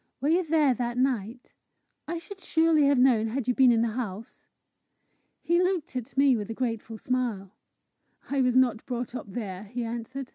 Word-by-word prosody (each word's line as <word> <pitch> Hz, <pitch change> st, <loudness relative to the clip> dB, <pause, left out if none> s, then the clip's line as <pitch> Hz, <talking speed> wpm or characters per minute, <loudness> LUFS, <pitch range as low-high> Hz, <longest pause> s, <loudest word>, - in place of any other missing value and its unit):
Were 280 Hz, +4 st, 0 dB
you 350 Hz, +3 st, +3 dB
there 305 Hz, -4 st, +3 dB
that 240 Hz, -1 st, -3 dB
night? 245 Hz, -2 st, -2 dB, 0.5 s
I 340 Hz, +2 st, -3 dB
should 375 Hz, +4 st, -10 dB
surely 320 Hz, -4 st, +3 dB
have 280 Hz, -1 st, +3 dB
known 245 Hz, -4 st, +4 dB
had 245 Hz, +2 st, -3 dB
you 250 Hz, -, +2 dB
been 255 Hz, -1 st, +5 dB
in 230 Hz, -1 st, +3 dB
the 235 Hz, -, 0 dB
house!" 220 Hz, -2 st, -6 dB, 1.0 s
He 345 Hz, +1 st, +2 dB
looked 365 Hz, -7 st, -1 dB
at 250 Hz, 0 st, -6 dB
me 275 Hz, -2 st, +5 dB
with 210 Hz, -2 st, -4 dB
a 225 Hz, -, -4 dB
grateful 225 Hz, -2 st, -3 dB
smile. 230 Hz, -6 st, -2 dB, 0.8 s
"I 275 Hz, -1 st, 0 dB
was 250 Hz, -1 st, +2 dB
not 245 Hz, -3 st, +3 dB
brought 245 Hz, -1 st, -4 dB
up 235 Hz, -5 st, -7 dB
there," 195 Hz, -3 st, -5 dB
he 240 Hz, +4 st, -5 dB
answered. 240 Hz, +3 st, -5 dB
250 Hz, 185 wpm, -27 LUFS, 225-275 Hz, 1.0 s, been